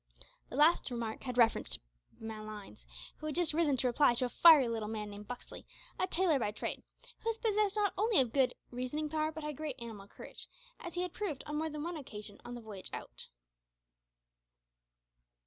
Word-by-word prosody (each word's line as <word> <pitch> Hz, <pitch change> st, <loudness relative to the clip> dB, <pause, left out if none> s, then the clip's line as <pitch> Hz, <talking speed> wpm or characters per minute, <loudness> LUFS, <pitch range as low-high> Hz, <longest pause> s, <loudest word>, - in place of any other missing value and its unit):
This -, -, -6 dB
last 310 Hz, +1 st, +5 dB
remark 235 Hz, -3 st, -4 dB
had 250 Hz, -1 st, -4 dB
reference 230 Hz, -2 st, +4 dB
to -, -, -9 dB, 0.4 s
Malines, 215 Hz, -, -8 dB, 0.3 s
who 310 Hz, -, -6 dB
had 305 Hz, -, -3 dB
just 345 Hz, -3 st, +3 dB
risen 300 Hz, -4 st, +2 dB
to 255 Hz, -, 0 dB
reply 245 Hz, 0 st, +4 dB
to 250 Hz, -, +1 dB
a -, -, -2 dB
fiery 300 Hz, -1 st, +8 dB
little 225 Hz, -2 st, -2 dB
man 210 Hz, -1 st, -4 dB
named 205 Hz, 0 st, -9 dB
Buxley, 245 Hz, +2 st, -8 dB, 0.4 s
a 370 Hz, -, +2 dB
tailor 345 Hz, -5 st, +3 dB
by 215 Hz, -, 0 dB
trade, 210 Hz, -, -4 dB, 0.4 s
who 455 Hz, -, -2 dB
was 455 Hz, -, -1 dB
possessed 425 Hz, -3 st, +1 dB
not 415 Hz, -2 st, +2 dB
only 435 Hz, -3 st, +5 dB
of 250 Hz, -4 st, +3 dB
good 265 Hz, -3 st, +3 dB, 0.2 s
reasoning 255 Hz, +5 st, -3 dB
power 310 Hz, 0 st, 0 dB
but 300 Hz, -2 st, -5 dB
great 300 Hz, -2 st, -4 dB
animal 220 Hz, -4 st, -8 dB
courage, -, -, -10 dB, 0.3 s
as 350 Hz, -, -8 dB
he 355 Hz, -, 0 dB
had 360 Hz, -, -4 dB
proved 380 Hz, -10 st, -3 dB
on 295 Hz, 0 st, -3 dB
more 320 Hz, +1 st, -1 dB
than 300 Hz, -1 st, -5 dB
one 340 Hz, 0 st, -3 dB
occasion 210 Hz, -7 st, -9 dB
on 245 Hz, -, -7 dB
the 240 Hz, -, -7 dB
voyage 210 Hz, -4 st, -8 dB
out. -, -, -7 dB
270 Hz, 195 wpm, -33 LUFS, 225-320 Hz, 0.4 s, fiery